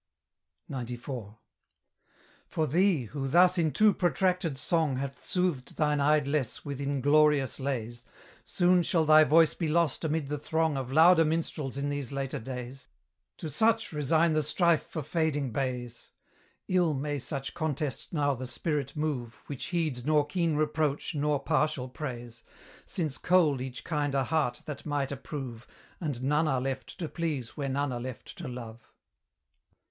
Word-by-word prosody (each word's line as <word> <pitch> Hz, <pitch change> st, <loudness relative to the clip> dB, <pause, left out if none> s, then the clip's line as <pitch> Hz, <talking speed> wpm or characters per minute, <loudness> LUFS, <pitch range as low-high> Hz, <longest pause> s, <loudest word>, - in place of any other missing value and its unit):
XCIV. 120 Hz, -4 st, -6 dB, 1.1 s
For 160 Hz, -, -1 dB
thee, 170 Hz, 0 st, +2 dB
who 135 Hz, +4 st, -4 dB
thus 180 Hz, +5 st, +5 dB
in 160 Hz, -2 st, +3 dB
too 210 Hz, +9 st, +4 dB
protracted 180 Hz, -3 st, +1 dB
song 155 Hz, 0 st, +1 dB
Hath 140 Hz, +1 st, -5 dB
soothed 180 Hz, -8 st, -1 dB
thine 150 Hz, -1 st, +2 dB
idlesse 145 Hz, -3 st, +1 dB
with 140 Hz, -1 st, -4 dB
inglorious 145 Hz, 0 st, +3 dB
lays, 120 Hz, -3 st, -3 dB, 0.4 s
Soon 180 Hz, 0 st, +3 dB
shall 165 Hz, -1 st, +1 dB
thy 155 Hz, 0 st, +8 dB
voice 160 Hz, +1 st, +5 dB
be 165 Hz, -, -2 dB
lost 165 Hz, -2 st, +1 dB
amid 160 Hz, -1 st, 0 dB
the 150 Hz, 0 st, -2 dB
throng 160 Hz, +1 st, 0 dB
Of 130 Hz, -1 st, -4 dB
louder 165 Hz, +3 st, +7 dB
minstrels 155 Hz, -4 st, -2 dB
in 140 Hz, +1 st, -1 dB
these 145 Hz, -2 st, -3 dB
later 135 Hz, -1 st, -3 dB
days: 125 Hz, +2 st, -7 dB, 0.5 s
To -, -, -5 dB
such 225 Hz, -, +1 dB
resign 155 Hz, +3 st, +2 dB
the 155 Hz, -, +2 dB
strife 170 Hz, +2 st, +2 dB
for 155 Hz, -, -6 dB
fading 155 Hz, -4 st, 0 dB
bays 125 Hz, -1 st, -4 dB, 0.6 s
Ill 175 Hz, -4 st, +2 dB
may 145 Hz, +1 st, -2 dB
such 135 Hz, 0 st, -4 dB
contest 150 Hz, -3 st, -3 dB
now 145 Hz, -3 st, +1 dB
the 130 Hz, 0 st, -5 dB
spirit 140 Hz, +2 st, -2 dB
move 135 Hz, -7 st, -2 dB
Which 140 Hz, -3 st, -5 dB
heeds 155 Hz, -8 st, -1 dB
nor 150 Hz, +1 st, +3 dB
keen 165 Hz, +1 st, 0 dB
reproach 150 Hz, -1 st, 0 dB
nor 145 Hz, -1 st, +1 dB
partial 155 Hz, -4 st, 0 dB
praise, 120 Hz, -4 st, -7 dB, 0.5 s
Since 155 Hz, -6 st, -2 dB
cold 160 Hz, -7 st, +3 dB
each 130 Hz, -1 st, -6 dB
kinder 145 Hz, -4 st, 0 dB
heart 140 Hz, -3 st, -1 dB
that 145 Hz, -2 st, -6 dB
might 145 Hz, -3 st, -1 dB
approve, 130 Hz, -4 st, -6 dB, 0.3 s
And 145 Hz, -7 st, -3 dB
none 150 Hz, +4 st, +2 dB
are 135 Hz, -3 st, +1 dB
left 135 Hz, +1 st, -4 dB
to 165 Hz, -, -3 dB
please 145 Hz, -10 st, -3 dB
where 140 Hz, -2 st, -3 dB
none 140 Hz, +1 st, 0 dB
are 120 Hz, -1 st, -4 dB
left 130 Hz, -, -7 dB
to 165 Hz, -, -5 dB
love. 120 Hz, -2 st, -8 dB
145 Hz, 150 wpm, -29 LUFS, 130-160 Hz, 1.1 s, thy